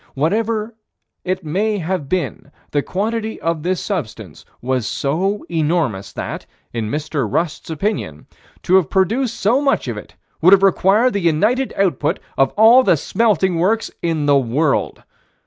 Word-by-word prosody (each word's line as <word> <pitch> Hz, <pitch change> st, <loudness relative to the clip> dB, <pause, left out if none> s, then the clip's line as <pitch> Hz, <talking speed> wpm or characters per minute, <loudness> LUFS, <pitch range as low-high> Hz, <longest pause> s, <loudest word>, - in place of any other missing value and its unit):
Whatever 215 Hz, +9 st, -1 dB, 0.5 s
it 185 Hz, 0 st, -2 dB
may 205 Hz, +7 st, 0 dB
have 175 Hz, -5 st, -3 dB
been 155 Hz, -5 st, -3 dB, 0.2 s
the 145 Hz, -, +1 dB
quantity 220 Hz, +6 st, -3 dB
of 165 Hz, -1 st, -2 dB
this 180 Hz, +3 st, -1 dB
substance 110 Hz, -, -5 dB, 0.2 s
was 130 Hz, -2 st, -1 dB
so 160 Hz, +11 st, -1 dB
enormous 150 Hz, -, -1 dB
that, -, -, -6 dB, 0.3 s
in 110 Hz, -3 st, -3 dB
Mr. 150 Hz, -5 st, -2 dB
Rust's 165 Hz, +3 st, -2 dB
opinion, 160 Hz, -, -3 dB, 0.4 s
to 185 Hz, -, +4 dB
have 180 Hz, -7 st, +1 dB
produced 225 Hz, +6 st, 0 dB
so 235 Hz, +8 st, +2 dB
much 275 Hz, -, +1 dB
of 115 Hz, -3 st, -3 dB
it 90 Hz, -3 st, -11 dB, 0.3 s
would 180 Hz, +4 st, +7 dB
have 195 Hz, 0 st, +5 dB
required 195 Hz, +6 st, +3 dB
the 200 Hz, -, 0 dB
united 210 Hz, +11 st, +1 dB
output 175 Hz, -3 st, +1 dB, 0.2 s
of 135 Hz, -, +3 dB
all 225 Hz, +4 st, +7 dB
the 175 Hz, -10 st, +3 dB
smelting 190 Hz, -1 st, +1 dB
works 215 Hz, +6 st, +1 dB
in 165 Hz, -3 st, -1 dB
the 145 Hz, -1 st, +4 dB
world. 135 Hz, +4 st, -1 dB
175 Hz, 150 wpm, -19 LUFS, 145-210 Hz, 0.5 s, would